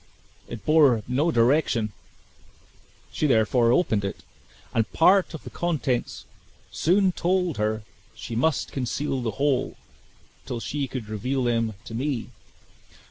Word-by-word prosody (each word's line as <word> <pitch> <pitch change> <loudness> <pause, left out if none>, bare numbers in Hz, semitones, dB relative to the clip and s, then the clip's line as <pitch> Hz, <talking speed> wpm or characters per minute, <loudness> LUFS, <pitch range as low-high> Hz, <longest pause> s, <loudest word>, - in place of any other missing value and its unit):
It 115 -4 -8
bore 145 -8 +4
no 140 +7 +1
direction; 120 -4 +2 1.2
she 155 - 0
therefore 115 -1 +3
opened 115 - +2
it, 100 - -5 0.5
and 115 -1 0
part 185 +1 +4
of 160 - -9
the - - -9
contents 150 -8 -2 0.5
soon 190 +3 +2
told 180 -3 0
her 110 +1 -1 0.3
she 115 - -7
must 155 +7 0
conceal 135 +1 -2
the 120 - -1
whole, 135 -2 0 0.7
till 120 - -3
she 140 +3 -3
could 125 -4 -6
reveal 125 +5 -2
them 115 -3 0
to - - -9
me. 130 0 -2
130 Hz, 130 wpm, -25 LUFS, 115-155 Hz, 1.2 s, bore